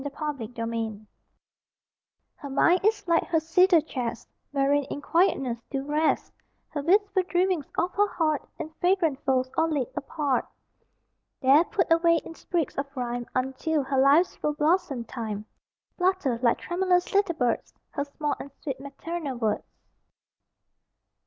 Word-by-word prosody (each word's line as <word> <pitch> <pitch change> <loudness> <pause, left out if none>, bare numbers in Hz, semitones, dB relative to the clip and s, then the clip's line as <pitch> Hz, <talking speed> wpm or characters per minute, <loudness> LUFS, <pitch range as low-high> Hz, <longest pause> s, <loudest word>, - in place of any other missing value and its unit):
THE 285 - -3
CEDAR 285 -5 -4
CHEST 230 -2 -4 1.3
Her 285 - -9
mind 340 +6 +4
is 415 -2 +1
like 335 -1 +3
her 325 - +2
cedar 335 +2 +4
chest 245 -6 -4 0.2
Wherein 285 +1 +2
in 285 - -5
quietness 280 -7 +1
do 270 -1 -2
rest 305 +2 0 0.4
The 290 - -2
wistful 395 +4 +3
dreamings 360 -4 0
of 355 +2 +1
her 410 +1 +3
heart 310 -6 0 0.2
In 315 0 -6
fragrant 350 -6 +2
folds 260 -1 +1
all 325 0 +2
laid 285 -6 -1
apart. 280 -2 -1 0.9
There, 275 +4 +6
put 370 -4 -1
away 335 0 +4
in - - -8
sprigs 330 -4 -2
of 280 - -2
rhyme 245 -1 -3
Until 265 +4 0
her 265 0 0
life's 285 +7 +5
full 300 - -1
blossom 305 -4 +1
time, 220 -3 -5 0.5
Flutter 360 -10 +1
(like 235 -2 +3
tremulous 360 0 0
little 395 -4 +2
birds) 245 -5 0 0.2
Her 285 -1 -2
small 290 +1 -2
and 280 - -7
sweet 275 -4 -3
maternal 280 0 -5
words. 220 -3 -1
295 Hz, 145 wpm, -26 LUFS, 265-345 Hz, 1.3 s, There